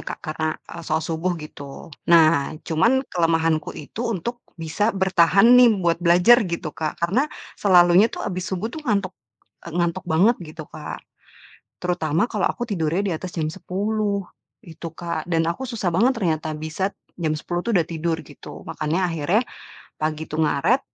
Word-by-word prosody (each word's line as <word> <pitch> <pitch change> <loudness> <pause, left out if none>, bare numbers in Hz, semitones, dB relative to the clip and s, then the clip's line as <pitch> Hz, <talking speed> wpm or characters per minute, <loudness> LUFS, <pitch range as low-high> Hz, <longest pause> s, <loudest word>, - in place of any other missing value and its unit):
Kak, - - -6
karena, 155 0 -2
eee, 170 - -7
sholat 160 +1 0
subuh, 165 +3 -1
gitu. 145 -1 -10 0.2
Nah, 155 -3 +5
cuman 235 - +2
kelemahanku 165 -2 +1
itu 155 +8 -8
untuk 235 +7 -4 0.2
bisa 165 +6 -1
bertahan 190 0 +4
nih 245 -1 +8
buat 170 -1 +2
belajar 180 +8 +6
gitu 165 -2 -4
Kak, 155 -1 -3
karena 220 - +1 0.3
selalunya 180 +1 +6
tuh - - -6
habis 185 -2 -3
subuh 195 +5 -3
tuh 315 - -6
ngantuk, 200 -4 0 0.6
eee, - - -9
ngantuk 175 +2 0
banget 190 +10 +4
gitu 155 0 -8
Kak, - - -7 0.9
terutama 170 -2 +1
kalau - - +1
aku 240 - -3
tidurnya 175 -3 0
di 190 - 0
atas 185 - -6
jam 155 - 0
10.00, 200 +2 -2 0.4
gitu 165 0 -8
Kak, 170 -1 -4
dan 165 -1 +2
aku 170 +10 -2
susah 215 -7 -1
banget 240 +9 +4
ternyata 160 -5 -1
bisa 160 +6 -2 0.3
jam 155 -1 +1
10.00 175 +3 -3
tuh 235 - 0
udah 165 - +2
tidur 165 0 -2
gitu, 145 - -11
makanya 165 +3 -1
akhirnya 165 +7 +1 0.6
pagi 155 0 -1
itu - - -4
ngaret 160 - +2
170 Hz, 165 wpm, -23 LUFS, 160-195 Hz, 0.9 s, nih